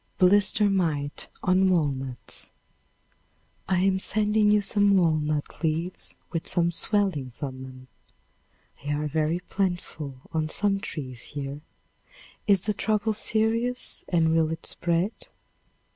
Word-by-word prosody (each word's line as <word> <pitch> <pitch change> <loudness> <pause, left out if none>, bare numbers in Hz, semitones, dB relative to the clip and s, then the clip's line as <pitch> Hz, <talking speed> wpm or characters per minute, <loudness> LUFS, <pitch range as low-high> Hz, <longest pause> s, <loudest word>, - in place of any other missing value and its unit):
Blister 205 +2 +5
Mite 155 -7 -1
on 185 +1 +4
Walnuts. 135 -8 -1 1.2
I 185 -2 +3
am 190 0 +3
sending 210 +1 +2
you 210 0 +5
some 205 -1 +4
walnut 155 -4 0
leaves 165 +3 -2 0.2
with 165 - -3
some 170 -1 +2
swellings 170 - -1
an 130 -2 -4
them. 130 -1 -10 1.0
They 145 +1 -1
are 150 +1 -1
very 155 +3 0
plentiful 175 -8 -3
on 155 -1 -1
some 195 +3 +1
trees 130 - -6 0.2
here. 140 +1 -4 0.9
Is 200 -3 +5
the 210 +2 -1
trouble 215 +1 +1
serious 225 +3 0
and 165 -3 +3
will 160 -1 +3
it 165 0 -5
spread? 175 +5 0
170 Hz, 120 wpm, -26 LUFS, 150-200 Hz, 1.2 s, Blister